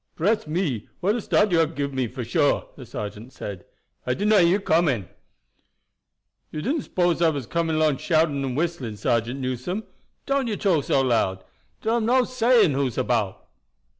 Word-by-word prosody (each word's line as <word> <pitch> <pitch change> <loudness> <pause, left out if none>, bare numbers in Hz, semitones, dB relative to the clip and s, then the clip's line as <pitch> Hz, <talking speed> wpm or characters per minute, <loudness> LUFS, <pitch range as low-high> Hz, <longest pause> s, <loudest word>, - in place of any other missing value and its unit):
"Bress 210 +3 +1
me, 150 - -2
what 195 +4 +1
a 240 - -2
start 210 0 +2
you 170 - +4
hab 165 0 +1
given 140 -1 -3
me, 130 -2 0
for 125 +2 -6
suah!" 145 +5 +1
the 130 -4 -11
sergeant 105 +4 -7
said. 95 -4 -7 0.4
"I 125 - -1
did 205 +2 0
not 210 -3 +6
hear 170 - +5
you 200 - +2
coming. 155 - +1 1.4
"You 155 - -5
didn't 290 +6 0
s'pose 175 -2 +1
I 165 - +5
was 140 -5 -3
coming 165 +4 -1
along 155 -3 +2
shouting 155 -3 +1
and 130 -1 -3
whistling, 155 -9 -2
Sergeant 120 +4 -1
Newson? 130 - -3 0.4
Don't 275 -2 0
you 215 -3 -2
talk 170 -8 +1
so 135 - +2
loud. 110 -7 +1 0.4
Dar 225 +2 +2
am 225 -2 -1
no 255 +1 +4
saying 245 -6 +3
who's 135 -3 -1
about." 115 -6 -1
155 Hz, 185 wpm, -24 LUFS, 125-195 Hz, 1.4 s, not